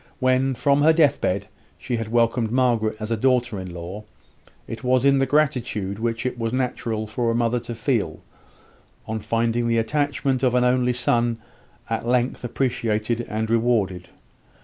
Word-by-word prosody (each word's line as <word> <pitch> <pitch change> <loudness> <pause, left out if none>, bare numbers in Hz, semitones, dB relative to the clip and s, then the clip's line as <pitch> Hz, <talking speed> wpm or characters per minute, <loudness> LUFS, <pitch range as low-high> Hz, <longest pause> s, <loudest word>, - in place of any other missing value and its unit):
When, 130 0 +2
from 140 +2 +2
her 160 +2 +6
deathbed, 140 - +2 0.3
she 120 -2 -3
had 115 -1 -4
welcomed 115 0 +1
Margaret 115 -3 +1
as 110 +1 -5
a - - +2
daughter 120 -2 +1
in 95 -1 -7
law, 90 +5 -7 0.6
it 115 - -7
was 130 +1 +2
in 140 -1 +5
the 135 - +2
gratitude 125 -9 0
which 115 +1 -2
it 125 -1 -3
was 115 -1 -1
natural 120 -3 -2
for 115 +2 -1
a 115 - 0
mother 120 +1 +1
to 120 0 -7
feel, 110 - -1 0.8
on 110 0 -3
finding 115 +2 0
the 115 0 +2
attachment 140 +2 0
of 125 -2 +2
an 125 - +3
only 125 0 +2
son 120 -1 +1 0.5
at 115 0 -2
length 125 +1 0
appreciated 115 -2 -1
and 110 +1 -2
rewarded. 110 -6 +1
120 Hz, 165 wpm, -23 LUFS, 110-130 Hz, 0.8 s, her